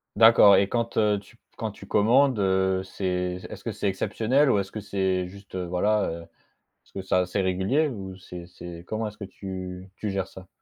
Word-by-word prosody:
D'accord 110 -3 +8
et 100 - +2
quand, 115 -1 -2
heu, 105 -2 +3
tu 105 +4 -19
p - - -49 0.2
quand 110 -2 -3
tu 100 - -13
commandes, 120 +6 +4
heu, 95 -1 +2
c'est 90 -1 -2
est-ce - - -9
que 115 - -3
c'est 105 0 -2
exceptionnel 120 +8 +2
ou 100 - +3
est-ce 95 0 -4
que 110 - -5
c'est 95 -3 -1
juste, 100 0 -12
voilà, 95 +4 +1
heu? 85 +1 -6 0.4
Est-ce - - -33
que 95 - -5
ça 90 -1 +2
c'est 90 +2 -2
régulier 95 +12 +1
ou 95 -6 -6
c'est 90 -2 -9
c'est 85 -1 -10
comment 110 0 -2
est-ce 105 - -11
que 100 - -7
tu 95 -1 -7
tu 105 - -3
gères 95 -1 -2
ça? 95 -1 -12
95 Hz, 210 wpm, -26 LUFS, 95-105 Hz, 0.4 s, D'accord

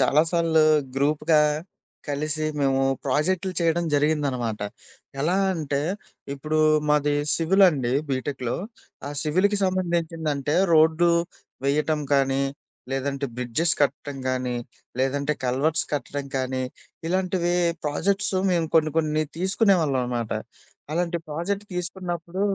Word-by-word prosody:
చాలా 150 +2 +4
సార్లు 165 -2 +3 0.3
గ్రూప్‌గా 150 +3 +3 0.7
కలిసి 155 +2 -1 0.2
మేము 135 -1 +2 0.2
ప్రాజెక్టులు 185 +4 0
చేయడం 170 +1 +2
జరిగిందనమాట. 140 -7 0 0.6
ఎలా 170 +6 +1 0.2
అంటే, 145 -3 -2 0.5
ఇప్పుడు 155 +3 -2 0.3
మాది 150 0 +3 0.2
సివిల్ 190 +4 +4
అండి, 130 -6 -1 0.2
బీటెక్‌లో. 130 -2 -2 0.5
ఆ - - -5
సివిల్‌కి 185 +7 +2
సంబంధించిందంటే 165 -6 -1 0.2
రోడ్లువేయటం 160 -2 +2
కానీ, 135 0 +2 0.5
లేదంటే 140 +1 -2
బ్రిడ్జెస్ 125 +7 +1
కట్టడం 140 0 -1
గానీ, 125 -1 -2 0.4
లేదంటే 140 +2 0
కల్వర్ట్స్ 135 +6 +1
కట్టడం 145 0 -3
కానీ 130 0 -1 0.5
ఇలాంటివి 180 -1 0 0.3
ప్రాజెక్ట్స్ 195 +7 0 0.2
మేము 170 -2 +1
కొన్ని 155 -1 +3
కొన్ని 155 -1 +1 0.2
తీసుకునేవాళ్ళం 185 - +2
అనమాట. 120 -2 -2 0.6
అలాంటి 170 +1 0
ప్రాజెక్ట్ 180 +7 -3
తీసుకున్నప్పుడు 175 0 -4
155 Hz, 100 wpm, -24 LUFS, 140-170 Hz, 0.7 s, చాలా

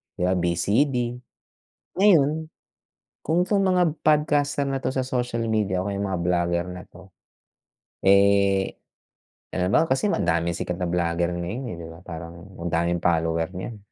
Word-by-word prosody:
kaya 90 +1 0
VCD. 100 - +1 1.0
Ngayon 160 -5 +3 0.7
kung 175 +3 +1
tong 200 0 +1
mga 180 -4 +2
podcaster 150 -2 +2
na 135 -1 -2
to - - -1
sa 130 -1 -1
social 125 -2 -2
media 105 -5 0
o 100 - -3
mga 100 -2 -2
blogger 85 0 0
na 90 0 -8
'to, 95 +1 -16 1.0
eh, 100 0 +4 0.8
halimbawa 95 - +2
kasi 130 +9 +1
madaming 85 - 0
sikat 90 - -3
na 90 - -2
blogger 85 0 0
ngayon 85 +9 -4
eh, - - -6
'di 80 - -8
ba 80 0 -12
parang 85 +1 -8 0.2
ang 85 - -2
daming 85 +1 0
follower 80 -1 +1
niyan. 95 +5 -6
95 Hz, 140 wpm, -24 LUFS, 85-135 Hz, 1.0 s, eh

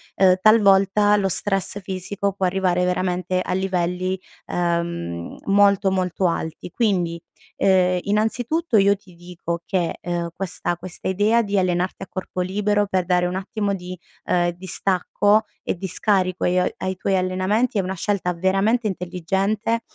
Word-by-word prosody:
ehm, 185 -1 +5
talvolta 205 -1 +5
lo 195 -1 +1
stress 195 +2 -1
fisico 190 +1 -3
può 195 -1 -1
arrivare 180 -1 +1
veramente 180 0 0
a 180 - -3
livelli, 185 0 -1 0.3
ehm, 170 - -2
molto, 200 -1 +4
molto 185 0 -1
alti. 165 0 -4
Quindi, 175 -6 0 0.4
ehm, 180 -1 +3
innanzitutto 230 +7 0
io 200 0 +5
ti 190 -2 -19
dico 170 -1 -5
che, 175 -3 -1
ehm, 175 -1 -2
questa 175 -2 -3
questa 180 0 -7
idea 210 +5 +3
di 200 -2 0
allenarti 180 0 -1
a - - -9
corpo 185 -1 -4
libero 205 +2 0
per 185 -2 0
dare 180 0 +2
un 180 - -3
attimo 200 +1 -2
di, 180 0 -7 0.3
ehm, 175 -1 +2
distacco 190 +4 +1 0.2
e - - -1
di 190 +2 -5
scarico 185 -1 +1
ai 180 +1 +2 0.2
ai 185 0 -3
tuoi 190 +1 0
allenamenti 185 +6 0
è - - +3
una 185 +1 -3
scelta 185 -1 -1
veramente 195 +6 +1
intelligente 195 +5 -1
190 Hz, 145 wpm, -22 LUFS, 180-200 Hz, 0.4 s, ehm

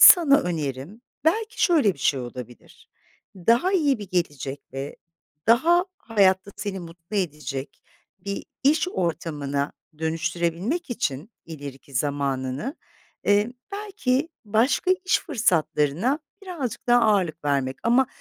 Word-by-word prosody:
sana 295 -6 +9
önerim 155 - -4 0.2
belki 445 +7 +1
şöyle 300 - +4
bir - - -20
şey 135 0 +2
olabilir, 120 0 -10 0.5
daha 235 - +3
iyi 295 - +3
bir 205 -2 -8
gelecek 145 -6 -2
ve 135 +1 -5 0.5
daha 330 - +5
hayatta 200 - +2
seni 200 -2 -4
mutlu 170 +4 -8
edecek 150 -7 -3 0.4
bir 200 +2 -5 0.2
iş 305 +6 +3
ortamına 150 - -2 0.3
dönüştürebilmek 170 - -1
için 155 - -2 0.2
ileriki 140 -3 -9
zamanını, 140 - -1 0.5
eee, 205 +3 +3 0.2
belki 385 -9 -1 0.2
başka 225 - +2
iş 370 - +3
fırsatlarına 185 - +1 0.2
birazcık 285 - -5
daha 240 0 +6
ağırlık 185 -9 +2
vermek. 135 -2 0
Ama 245 +3 +4
190 Hz, 110 wpm, -25 LUFS, -, 0.5 s, sana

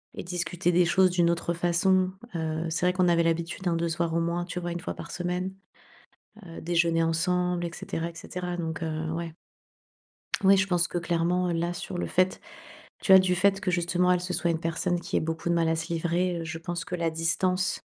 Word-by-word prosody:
et - - -5
discuter 175 0 -1
des 175 0 +4
choses 185 +1 +4
d'une 175 -1 +3
autre 170 0 0
façon. 185 +2 +2 0.2
Heu, 160 0 -2
c'est 175 +2 +1
vrai 180 - +3
qu'on 180 -1 +2
avait 170 -1 +4
l'habitude, 165 +2 -1
hein, 170 - +2
de 170 0 0
se 160 - -3
voir 170 -1 0
au - - +3
moins, 170 +1 -1
tu 180 0 -5
vois, 175 0 -4
1 170 - -3
fois 180 - -5
par - - -8
semaine, 180 +2 -2 0.9
heu, 165 - -9
déjeuner 165 -1 +2
ensemble 180 +2 0
et 170 - -2
cetera 165 0 -4
et - - -16
cetera. 180 0 -5
Donc, 165 -1 -4
heu, 160 0 -2
ouais. 165 -1 -4 1.1
Oui, 195 +1 +7
je 195 +1 +2
pense 175 -2 +2
que 175 - -2
clairement, 175 +1 0
heu, - - 0
là, 170 +1 -1
sur 175 +1 -6
le - - -1
fait, 185 +1 +1 0.6
tu - - -3
vois, 190 - +11
du 185 -1 +2
fait 195 +2 +3
que 190 -2 -1
justement, 175 +1 +2
elle, 180 - +2
se 180 0 -4
soit 170 - +1
une 165 -1 -1
personne 170 +2 -1
qui - - -3
ait - - +3
beaucoup 160 +1 -3
de 170 - +2
mal 165 -1 +2
à 165 - +2
se 165 +1 -5
livrer, 170 +1 0
heu, - - -5
je 165 0 -5
pense 170 0 -4
que 180 - -6
la 165 -2 0
distance, 180 +3 0
175 Hz, 235 wpm, -27 LUFS, 165-180 Hz, 1.1 s, vois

